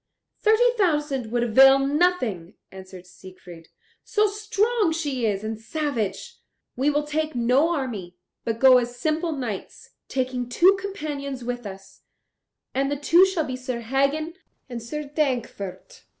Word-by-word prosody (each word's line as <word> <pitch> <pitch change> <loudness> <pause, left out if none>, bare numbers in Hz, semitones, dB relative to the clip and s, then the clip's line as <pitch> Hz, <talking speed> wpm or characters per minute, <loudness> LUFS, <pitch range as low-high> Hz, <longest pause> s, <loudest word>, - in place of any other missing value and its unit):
"Thirty 460 +3 +4
thousand 295 - 0
would 240 0 +1
avail 270 +4 +7
nothing." 275 - 0 0.2
answered 185 -1 -11
Siegfried, 180 -2 -14 0.4
"so 425 -1 +2
strong 420 -1 0
she 285 -7 -1
is 200 -1 -2
and 220 0 -4
savage. 250 - -3 0.4
We 270 +4 +1
will 295 0 +1
take 310 0 -2
no 250 +7 +3
army, 210 - -5 0.3
but 225 -1 -2
go 255 +1 +7
as 240 0 -4
simple 315 +5 -1
knights, 245 -10 -6 0.2
taking 255 -2 -2
two 360 +10 +5
companions 290 -9 -5
with 245 -2 -4
us, 195 0 -12 0.7
and 275 +1 0
the 290 - -1
two 340 +6 +5
shall 365 -4 -1
be 255 - -4
Sir 255 -2 -5
Hagen 275 +7 0 0.3
and 240 -3 -6
Sir 300 +7 -5
Dankwart." 250 - -3
270 Hz, 140 wpm, -24 LUFS, 230-310 Hz, 0.7 s, avail